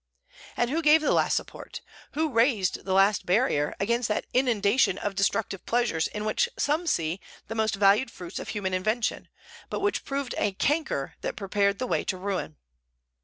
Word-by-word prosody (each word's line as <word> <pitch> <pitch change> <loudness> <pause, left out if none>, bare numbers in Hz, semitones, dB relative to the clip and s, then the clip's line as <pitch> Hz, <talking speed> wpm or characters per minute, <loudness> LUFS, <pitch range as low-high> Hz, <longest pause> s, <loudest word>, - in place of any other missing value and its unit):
And 240 +1 +1
who 325 +3 0
gave 305 0 +6
the 310 - +1
last - - +2
support, - - -7 0.3
who 315 0 0
raised 230 -5 +1
the 190 - -1
last 195 +1 +4
barrier, 180 - +1
against 235 +4 0
that 210 - -1
inundation 230 -5 +2
of 205 - -3
destructive 195 0 -1
pleasures 235 -9 +1
in 210 0 -5
which 480 - +1
some 315 +4 0
see 165 - 0 0.3
the 225 - -4
most 220 -1 0
valued 205 +5 +4
fruits 180 -4 -8
of - - -7
human 195 -3 -3
invention, 215 +5 -1 0.4
but - - -3
which 405 +1 0
proved 275 -2 -3
a 200 - 0
canker 285 - -1
that - - -3
prepared 200 0 0
the 255 - -2
way - - 0
to 185 - -2
ruin? 185 - -4
210 Hz, 175 wpm, -27 LUFS, 195-255 Hz, 0.4 s, gave